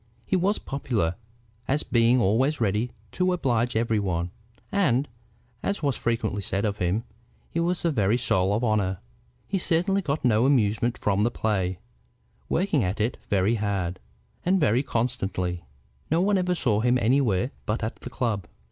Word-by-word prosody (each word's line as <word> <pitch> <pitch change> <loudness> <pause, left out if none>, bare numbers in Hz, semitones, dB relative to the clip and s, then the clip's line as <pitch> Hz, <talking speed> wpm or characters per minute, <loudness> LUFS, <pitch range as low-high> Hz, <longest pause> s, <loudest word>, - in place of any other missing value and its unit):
He - - 0
was 190 +4 +2
popular, 115 -11 -1 0.5
as 145 +3 +1
being 120 +1 +3
always 125 +8 +2
ready 110 +2 +1 0.2
to 185 0 +1
oblige 125 -8 0
every 115 -1 +1
one, 90 -3 -1 0.4
and, 145 -9 +2 0.5
as 200 -4 -2
was 140 -3 +1
frequently 115 -3 -1
said 100 +2 -1
of 105 -1 -1
him, 90 +5 0 0.5
was 170 +2 0
the 170 - +2
very 105 -4 +2
soul 95 -6 +1
of 115 - -1
honor. 105 -5 +1 0.5
He 195 - -1
certainly 185 +3 +1
got 145 -5 -2
no 115 +1 +4
amusement 120 -2 +2
from 100 0 +1
the 115 - +3
play, 95 -6 -1 0.7
working 165 - +1
at 95 +4 -2
it 110 +3 0
very 100 +2 +2
hard, 100 -5 -1 0.4
and 190 +2 +3
very 130 -5 +3
constantly. 95 -9 -2 0.4
No 160 - +2
one 195 +1 +3
ever 180 0 +1
saw 115 -10 +1
him 125 +2 +3
anywhere 125 -1 +2 0.2
but 105 +1 -1
at 110 - -3
the - - -8
club. 115 -8 -2
115 Hz, 160 wpm, -26 LUFS, 100-140 Hz, 0.7 s, no